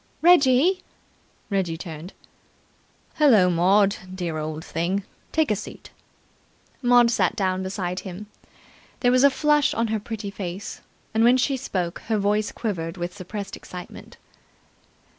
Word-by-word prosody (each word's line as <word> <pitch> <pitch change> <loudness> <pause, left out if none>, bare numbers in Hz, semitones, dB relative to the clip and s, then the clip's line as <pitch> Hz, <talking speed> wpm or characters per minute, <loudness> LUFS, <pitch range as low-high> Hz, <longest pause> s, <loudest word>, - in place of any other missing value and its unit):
"Reggie!" 340 +1 +5 0.7
Reggie 180 -5 0
turned. 165 +1 -8 1.1
"Hullo, 220 -12 +6
Maud, 195 +4 +3 0.2
dear 170 -4 -3
old 155 +1 -5
thing. 180 +5 -1 0.3
Take 315 -6 +1
a - - +3
seat." 205 - -9 0.9
Maud 245 -2 +5
sat 235 - +1
down 190 -3 0
beside 190 -1 -3
him. 190 +2 -8 0.8
There 245 - +4
was 255 +1 +4
a 280 - +8
flush 295 +1 +2
on 230 -1 0
her 220 0 0
pretty 210 -1 -6
face, 190 0 -6 0.3
and 220 +1 +3
when 245 +2 +6
she 270 +2 +1
spoke 185 -9 -3
her 220 -1 +1
voice 205 +1 +1
quivered 170 -6 -4
with 175 +1 -4
suppressed 200 +1 -6
excitement. 180 -1 -10
200 Hz, 135 wpm, -24 LUFS, 180-245 Hz, 1.1 s, a